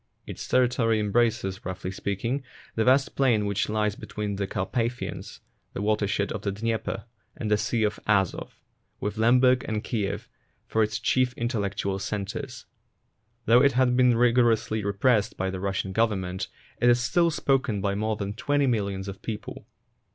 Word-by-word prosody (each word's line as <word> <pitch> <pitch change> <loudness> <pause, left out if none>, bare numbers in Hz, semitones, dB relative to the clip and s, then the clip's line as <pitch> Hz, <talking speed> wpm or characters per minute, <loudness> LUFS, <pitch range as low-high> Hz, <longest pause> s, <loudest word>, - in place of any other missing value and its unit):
Its - - -7
territory 125 -3 +2
embraces, 105 -2 0
roughly 95 0 -5
speaking, 100 +8 -2 0.3
that 110 - 0
vast 135 +2 +3
plain 120 -6 +3
which 100 0 -1
lies 105 -1 +1
between 105 -2 -5
the 100 -1 -2
Carpathians, 115 +6 -3 0.3
the - - -4
watershed 105 -1 0
of 110 - -4
the 100 - -1
Dnieper, 110 +3 -3 0.3
and 110 -2 -3
the - - +6
Sea 115 0 0
of 105 -1 0
Azov, 100 -4 0 0.4
with 105 +1 -3
Lemberg 125 +3 +4
and 110 -1 -2
Kiev 105 -5 -2 0.4
for 110 - 0
its 110 0 +1
chief 130 +1 +1
in 120 - -1
tellectual 100 -4 -2
centres. 105 +6 -5 0.8
Though 120 +2 +6
it 140 0 +4
has 130 0 +3
been 125 -1 +4
rigorously 115 -3 +3
repressed 105 +2 +1
by 95 0 -1
the 95 - -5
Russian 95 0 -2
Government, 95 -5 0 0.3
it 120 - +4
is 120 0 +5
still 170 +8 +2
spoken 135 -8 +1
by 100 0 0
more 110 +2 -1
than 100 -1 -4
twenty 145 +6 +1
millions 100 -6 -1
of 100 -1 -7
people. 110 -2 -6
110 Hz, 160 wpm, -26 LUFS, 100-120 Hz, 0.8 s, the